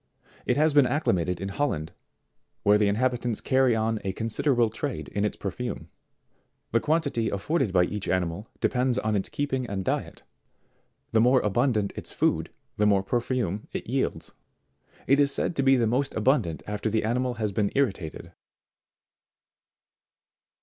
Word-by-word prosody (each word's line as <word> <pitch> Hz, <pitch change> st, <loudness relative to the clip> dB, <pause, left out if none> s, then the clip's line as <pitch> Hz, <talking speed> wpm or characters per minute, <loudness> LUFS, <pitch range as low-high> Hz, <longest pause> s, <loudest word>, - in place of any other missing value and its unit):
It -, -, +2 dB
has 155 Hz, 0 st, +3 dB
been 145 Hz, -3 st, +6 dB
acclimated 90 Hz, -, 0 dB
in 95 Hz, -, -4 dB
Hol 145 Hz, +9 st, 0 dB
land, 80 Hz, -, -4 dB, 0.7 s
where 105 Hz, +1 st, +5 dB
the 105 Hz, -, +3 dB
inhabitants 120 Hz, +2 st, 0 dB
carry 130 Hz, -3 st, +3 dB
on 110 Hz, 0 st, 0 dB
a 95 Hz, -1 st, -2 dB
considerable 115 Hz, +3 st, +1 dB
trade 140 Hz, +4 st, -4 dB
in 100 Hz, -, -2 dB
its 105 Hz, -, -1 dB
perfume. 120 Hz, +5 st, -5 dB, 0.8 s
The 115 Hz, -, +3 dB
quantity 145 Hz, -6 st, 0 dB
afforded 135 Hz, -, 0 dB
by 90 Hz, -1 st, +4 dB
each 100 Hz, +2 st, -3 dB
animal 90 Hz, +3 st, -1 dB
depends 125 Hz, 0 st, +1 dB
upon 110 Hz, -3 st, 0 dB
its 95 Hz, -, -1 dB
keeping; 130 Hz, -3 st, -2 dB
and 95 Hz, -3 st, -4 dB
diet; -, -, -3 dB, 0.9 s
the 110 Hz, -, +4 dB
more 125 Hz, +2 st, +5 dB
abundant 105 Hz, -1 st, +1 dB
its -, -, -7 dB
food, -, -, 0 dB, 0.3 s
the 105 Hz, -, +3 dB
more 100 Hz, -2 st, +3 dB
per 120 Hz, +5 st, 0 dB
fume 115 Hz, -6 st, -2 dB
it -, -, -4 dB
yields. 130 Hz, +3 st, -2 dB, 0.7 s
It 140 Hz, +2 st, +4 dB
is 140 Hz, -1 st, +3 dB
said 160 Hz, -, -1 dB
to -, -, +3 dB
be 135 Hz, 0 st, +5 dB
most 130 Hz, +5 st, 0 dB
abundant 110 Hz, -, +1 dB
after 105 Hz, +1 st, -2 dB
the 110 Hz, +1 st, 0 dB
animal 125 Hz, +2 st, 0 dB
has 110 Hz, -2 st, -2 dB
been 100 Hz, +1 st, 0 dB
irritated. 100 Hz, -, -1 dB
115 Hz, 155 wpm, -26 LUFS, 100-130 Hz, 0.9 s, been